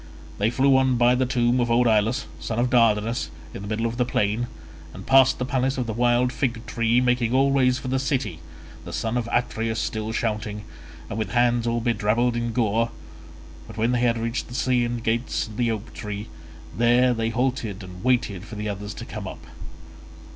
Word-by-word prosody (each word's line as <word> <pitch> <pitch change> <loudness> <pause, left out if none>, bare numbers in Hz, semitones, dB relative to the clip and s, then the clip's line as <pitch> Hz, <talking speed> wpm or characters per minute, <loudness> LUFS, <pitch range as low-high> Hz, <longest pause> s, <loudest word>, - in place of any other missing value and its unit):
They 105 +2 +2
flew 135 +3 +4
on 130 -1 +3
by 120 +1 +5
the 130 0 +1
tomb 120 0 +2
of 120 -1 +1
old 120 +1 +3
Ilus, 115 +4 +2
son 115 - -4
of 120 +1 +1
Dardanus, 115 -1 +2 0.2
in - - -7
the 100 - -7
middle 110 +2 -1
of 115 +1 -2
the 125 - +3
plain, 110 0 0 0.5
and 95 - -9
past 135 -1 +5
the 125 - -2
place 130 0 0
of 125 - -1
the 110 - -3
wild 120 +2 +2
fig 115 -4 -2
tree 115 +1 +1
making 125 -1 +1
always 135 -2 +3
for 130 - -7
the 130 +1 0
city—the 135 0 -5
son 115 +1 -2
of 120 -1 -1
Atreus 115 -2 -1
still 110 0 -2
shouting, 105 -2 -2 0.4
and 105 - -4
with 110 - -3
hands 120 -1 +2
all 115 0 0
bedrabbled 115 +1 +1
in 120 0 -1
gore; 115 0 +1 0.8
but 110 -1 -11
when 115 +2 +1
they 125 - +1
had 120 -1 +2
reached 115 +2 -3
the 120 - -9
Scaean 120 -2 0
gates 115 +2 0
and 110 -1 -11
the 120 -2 +1
oak 110 0 -4
tree, 105 0 -6 0.5
there 120 +2 +4
they 115 -1 -1
halted 115 -4 -2
and 90 0 -10
waited 120 -7 +1
for 110 - -9
the 105 +1 -4
others 105 0 -5
to - - -7
come - - -6
up. - - -9
120 Hz, 195 wpm, -24 LUFS, 110-125 Hz, 0.8 s, by